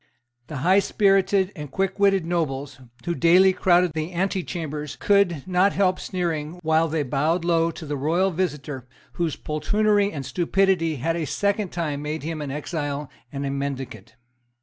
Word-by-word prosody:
The 150 - -6
highspirited 195 0 +3
and 150 -4 -7
quickwitted 195 0 +1
nobles 145 -5 -2 0.3
who 170 - 0
daily 180 +3 +5
crowded 180 -1 +3
the 160 +3 -3
antechambers 170 -5 -3
could 190 -8 +2
not 185 +2 +3
help 185 -2 +2
sneering 170 -3 -3
while 160 +1 +3
they 155 -1 -1
bowed 155 +6 0
low 165 -1 +2
to 165 0 -8
the 145 0 -3
royal 165 +7 +1
visitor, 150 -7 -3 0.3
whose 170 -4 -1
poltroonery 205 +6 +1
and 140 -3 -6
stupidity 175 +3 +1
had 160 +5 -1
a 165 -2 -2
second 200 +4 0
time 155 -5 -3
made 150 0 -4
him 160 0 -4
an 145 - -4
exile 145 0 -4 0.2
and 140 0 -4
a 135 - -2
mendicant. 140 -1 -5
165 Hz, 150 wpm, -24 LUFS, 150-185 Hz, 0.3 s, daily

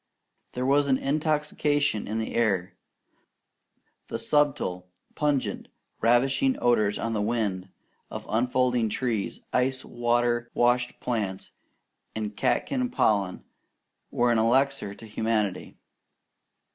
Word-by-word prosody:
There 125 +1 -2
was 140 +1 +3
intoxication 145 -2 0
in 110 - -2
the 110 - -3
air. 100 -5 +1 1.3
The - - -3
subtle, 135 -12 0 0.2
pungent, 145 -3 -1 0.3
ravishing 135 - +3
odours 110 -4 +2
on 115 - -2
the 105 - 0
wind, 105 -4 -1 0.4
of - - -7
unfolding 125 0 +1
leaves, 115 -6 -2
ice 130 +1 +1
water 120 0 0
washed 125 0 +2
plants, 105 -6 -3 0.6
and 105 -1 -4
catkin 255 - 0
pollen, 100 - +1 0.7
were 120 0 +2
an 115 - +3
elixir 120 -2 +1
to 115 - -12
humanity. 110 -3 -2
120 Hz, 105 wpm, -26 LUFS, 110-135 Hz, 1.3 s, was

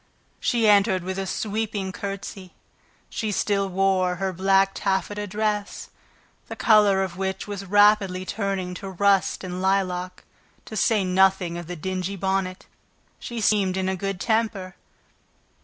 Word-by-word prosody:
She 235 -3 +1
entered 200 -3 +4
with 190 +1 -4
a 195 - -3
sweeping 210 -1 -2
courtesy. 195 -1 -7 0.5
She 215 -2 -3
still 200 -1 0
wore 185 -1 +1
her 190 0 -2
black 195 +2 +3
taffeta 205 +1 -2
dress, 210 0 -3 0.6
the - - -7
color 205 -3 +4
of 185 -2 -5
which 190 +1 -3
was 200 -1 -6
rapidly 205 -2 +4
turning 195 -3 -3
to 195 +1 -7
rust 195 +1 +1
and 180 0 -5
lilac, 185 -1 -1 0.4
to 220 - -8
say 215 -1 +2
nothing 185 -1 +2
of 175 -1 -6
the 180 - -5
dingy 185 +3 -3
bonnet. 190 -1 -2 0.5
She 235 -1 -6
seemed 200 -3 +2
in 190 0 -1
a 190 - 0
good 195 0 -4
temper. 220 -4 -1
195 Hz, 140 wpm, -24 LUFS, 185-205 Hz, 0.6 s, entered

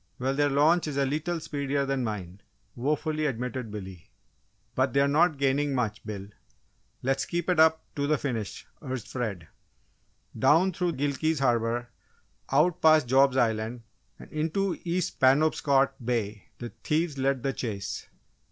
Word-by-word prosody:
"Well, 130 +2 -1
their 145 +1 +2
launch 155 +5 +3
is 145 -2 -4
a 140 - +2
lee 145 +3 0
tle 175 +2 -3
speedier 140 -2 -2
than 135 -1 -1
mine," 100 -4 -5 0.3
wofully 150 +4 -1
admitted 125 -2 -3
Billy. 95 -5 -9 0.6
"But 130 -1 +1
they're 140 0 +4
not 155 +2 +3
gaining 140 +1 +1
much, 110 -4 -2
Bill! 100 -2 -6 0.7
Let's 135 +1 +1
keep 175 -1 -2
it 175 - +1
up 160 0 +5
to 145 0 0
the 155 0 +2
finish!" 115 -8 -4 0.2
urged 130 -6 -5
Fred. 105 -10 -4 0.9
Down 165 +8 +4
through 175 0 -1
Gilkey's 145 +3 0
Harbour, 120 -2 0 0.6
out 155 +5 +3
past 155 -3 +6
Job's 135 +1 +4
Island, 115 0 0 0.3
and - - -13
into 165 +5 -1
East 175 0 -2
Penobscot 135 -1 +3
Bay, 110 -4 -2
the 120 - -6
thieves 155 -2 0
led 135 -1 0
the 135 - 0
chase. 105 -7 -4
135 Hz, 150 wpm, -27 LUFS, 120-155 Hz, 0.9 s, past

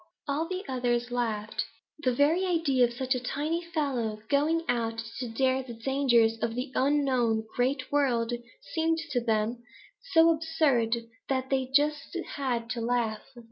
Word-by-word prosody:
"All 295 +3 0
the 370 +2 -4
others 245 -2 0
laughed. 225 -3 -1 0.4
The 255 -4 +1
very 295 +8 +3
idea 325 -9 +3
of 240 - -4
such 260 +1 0
a 255 - -1
tiny 300 +7 -2
fellow 275 -10 -1
going 310 +4 +2
out 230 -2 0 0.2
to 250 - -3
dare 260 +3 +1
the 250 -3 -8
dangers 235 -2 +2
of 230 0 -1
the 255 +2 -3
unknown 255 -6 +2
Great 255 +3 0
World 245 -5 +2 0.4
seemed 325 0 +2
to 245 -4 0
them 225 +1 0 0.5
so 330 0 +7
absurd 305 -8 +2 0.3
that 265 0 -1
they 265 -1 +1
just 295 +4 +1 0.2
had 245 -5 -1
to 240 - -2
laugh. 230 -2 0
260 Hz, 150 wpm, -28 LUFS, 235-290 Hz, 0.5 s, so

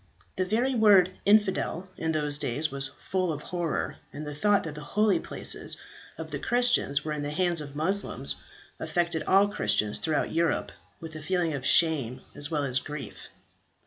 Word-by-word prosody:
The 185 - 0
very 235 +7 +1
word 205 -6 +5 0.2
"infidel" 200 -3 +2
in 160 0 -2
those 150 -2 +2
days 145 +5 0
was 135 0 -1
full 185 +6 -2
of 150 -1 -5
horror, 175 -3 -3
and 150 +1 -7
the 150 - -5
thought 205 +7 +2
that 160 - -5
the 150 - -8
holy 210 +7 +2
places - - -1 0.4
of - - -7
the - - -3
Christians 240 - +2
were 155 - -2
in 150 - -4
the 145 - -3
hands 170 +1 0
of 145 -1 -9
Moslems, 190 +7 -1 0.4
affected 170 -2 -1
all 195 +2 +5
Christians 105 - 0
throughout 155 -3 0
Europe 165 0 0 0.3
with 160 -1 -9
a 155 - -7
feeling 175 0 0
of 135 -2 -3
shame 145 -8 +3
as 145 - -3
well 150 -3 -1
as 130 -1 +1
of - - -15
grief. 150 -1 -8
160 Hz, 180 wpm, -27 LUFS, 145-190 Hz, 0.4 s, word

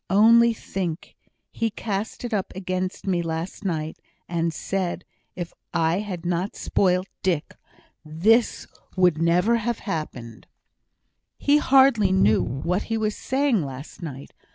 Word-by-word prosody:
Only 230 +4 +6
think! 185 -6 -5 0.4
he 230 - -1
cast 210 +2 -4
it 240 - -4
up 200 -3 -1
against 185 0 -3
me 180 -3 +1
last 165 +4 -4
night, 160 -4 -3 0.3
and 170 -1 0
said, 180 +2 -3 0.3
if 175 -2 -5 0.2
I 165 +2 +2
had 185 -5 -5
not 180 +3 -1
spoilt 185 -1 +1 0.2
Dick 170 -4 -1 0.5
this 200 +10 +2 0.3
never 175 +3 +3
would 235 - +3
have 235 +1 -1
happened." 130 - -6 0.9
"He 290 +1 +4
hardly 265 -8 +5
knew 110 - +4
what 170 +9 -1
he 225 - 0
was 215 -1 -1
saying 265 -5 +1
last 135 +6 -8
night. 140 -5 -8
185 Hz, 130 wpm, -24 LUFS, 165-215 Hz, 0.9 s, Only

